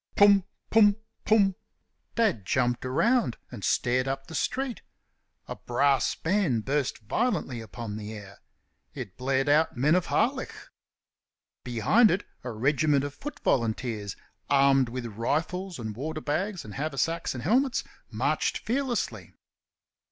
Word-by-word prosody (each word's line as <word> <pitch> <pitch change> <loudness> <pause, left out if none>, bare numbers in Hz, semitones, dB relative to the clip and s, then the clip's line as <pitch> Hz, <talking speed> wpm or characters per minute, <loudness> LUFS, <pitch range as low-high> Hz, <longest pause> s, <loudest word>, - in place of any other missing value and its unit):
"Pum! 200 -2 +6 0.3
pum! 210 -2 +6 0.3
pum!" 205 -3 +4 0.6
Dad 215 - +1
jumped 120 +4 0
round 220 - +2
and 115 -6 -8
stared 125 +1 +1
up 135 0 -3
the 160 - -11
street. 255 - -2 0.7
A - - -5
brass 135 +3 +1
band 165 - 0
burst 140 -1 0
violently 140 - -1
upon 110 0 -7
the 105 0 -6
air. 100 -2 -11 0.6
It 120 -9 -7
blared 135 +1 0
out 150 -1 +3
"Men 145 +6 +3
of 180 -1 +2
Harlech." - - 0 1.1
Behind 125 - +4
it 190 +3 0 0.2
a 125 - -4
regiment 140 +5 +2
of 145 0 -4
foot 295 - -8
volunteers, 110 -4 -1 0.3
armed 135 -2 +4
with 125 0 -5
rifles 155 - -2
and 110 -3 -5
waterbags 160 - -3
and 105 - -9
haversacks 155 +3 -1
and 125 - -6
helmets, 255 - +2 0.3
marched - - 0
fearlessly. 235 - -2
140 Hz, 130 wpm, -27 LUFS, 120-190 Hz, 1.1 s, Pum